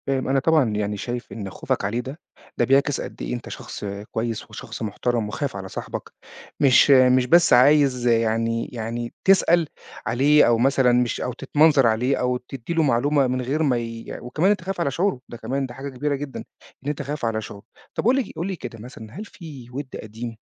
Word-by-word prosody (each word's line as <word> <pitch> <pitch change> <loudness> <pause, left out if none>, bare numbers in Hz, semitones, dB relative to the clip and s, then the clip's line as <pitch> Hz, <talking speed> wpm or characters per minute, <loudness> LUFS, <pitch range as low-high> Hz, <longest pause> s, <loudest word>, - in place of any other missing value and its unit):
فاهم. 135 -1 0
أنا 135 +1 +2
طبعًا 155 -4 +3
يعني 105 -1 -2
شايف 120 +3 -5
إن 100 -4 -6
خوفك 95 - -2
عليه 110 +5 -1
ده، 130 +6 -7 0.4
ده - - +3
بيعكس 140 +1 +2
قد - - -8
إيه - - -3
أنت - - -6
شخص - - -7 0.3
كويس 115 0 -3
وشخص 110 - -8
محترم 115 +1 -1
وخايف 140 +2 -3
على 95 -1 -6
صاحبك، - - -6 0.5
مش 140 +1 +6
مش 130 -1 +6
بس 170 +6 +5
عايز 130 -1 +5
يعني 115 0 +1
يعني 120 0 -4
تسأل 175 -4 +5 0.4
عليه 145 +5 +4
أو 120 -1 +4
مثلًا 130 +1 +3
مش 120 -1 +1
أو 125 - -2
تتمنظر 145 +1 +3
عليه 120 +5 +1
أو 125 0 0
تدّي 125 +4 -7
له 165 -1 +2
معلومة 140 +1 +2
من 130 0 -1
غير 140 +6 -1
ما 130 -5 +2
ي 115 -1 -6
وكمان 155 +10 +1
أنت 205 - 0
خايف 185 0 -4
على 140 - 0
شعوره، 180 -1 0
ده 120 - -8
كمان 135 +5 -2
ده 120 - -8
حاجة 135 +2 -6
كبيرة 140 +2 -2
جدًا، 140 -1 -6 0.4
إن 145 - -3
أنت 150 0 -3
خايف 140 -2 -4
على 110 -1 -1
شعوره. 100 -1 -10 0.3
طَب - - -2
قل 250 +3 +5
لي 270 - +2
ك - - -11
قل 165 +3 -3
لي 195 - -3
كده 120 -8 -8
مثلًا، 115 -2 -10
هل 215 - -6
في 150 - -11
وِد 135 +1 -6
قديم 115 +1 -7
125 Hz, 210 wpm, -23 LUFS, 115-145 Hz, 0.5 s, مش